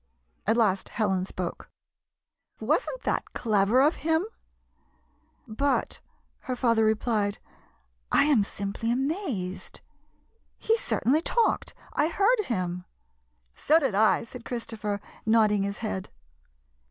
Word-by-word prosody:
At 220 +2 +3
last 195 -5 +2
Helen 195 -4 0
spoke: 185 -2 -5 0.5
" - - -51
Was - - +2
n't - - -7
that - - -2
clever 215 +2 +3
of 300 +4 +3
him? 320 +4 +1 0.4
" - - -41 0.2
" - - -40 0.2
But," 275 +6 -1 0.4
her 255 - -4
father 230 -2 +2
replied, 215 -2 +1 0.4
" - - -40 0.3
I - - +5
am 280 -8 +4
simply 200 +3 -3
amazed! 260 - -3 0.8
He 450 - +2
certainly 305 - +1
talked. 465 +6 0 0.2
I 295 - +2
heard 425 +5 +2
him." 180 -5 -2 0.7
"So 310 - +3
did 275 -9 +1
I," 215 +2 +3
said 235 +1 -10
Christopher, 220 -4 -4 0.2
nodding 215 -2 +3
his 200 +1 -2
head. 190 -3 -3
225 Hz, 130 wpm, -27 LUFS, 200-280 Hz, 0.8 s, I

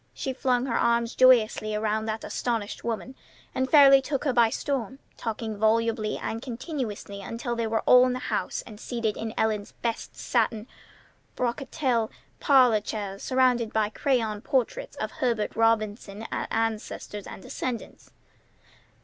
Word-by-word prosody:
She 265 - -3
flung 250 -1 +1
her 240 -3 0
arms 235 0 +2
joyously 220 -4 +4
around 215 +1 -1
that 220 0 -3
astonished 225 -4 -3
woman, 235 +3 -3 0.4
and 260 0 -1
fairly 275 -2 +8
took 275 0 -2
her 275 -4 +1
by 235 -2 +5
storm, 265 -1 -3 0.2
talking 220 -1 -4
volubly 220 0 +1
and 225 - -4
continuously 235 - -5
until 235 +3 -4
they 230 -1 -1
were 225 0 0
all 250 0 +6
in 250 - 0
the - - -2
house - - -2
and 210 -3 -11
seated 230 -3 -2
in 220 0 -4
Ellen's 215 -2 0
best 230 -1 -3
satin 215 -1 0 0.7
brocatelle 250 -1 -1 0.3
parlor 250 -7 +5
chairs, 200 -2 -5
surrounded 250 -3 +2
by 215 -1 +2
crayon 225 -4 0
portraits 405 - -1
of - - -3
Herbert 240 -8 -1
Robinson's 220 -1 0
ancestors 220 -2 -3
and - - -9
descendants. 245 -3 -5
230 Hz, 140 wpm, -26 LUFS, 215-255 Hz, 0.7 s, fairly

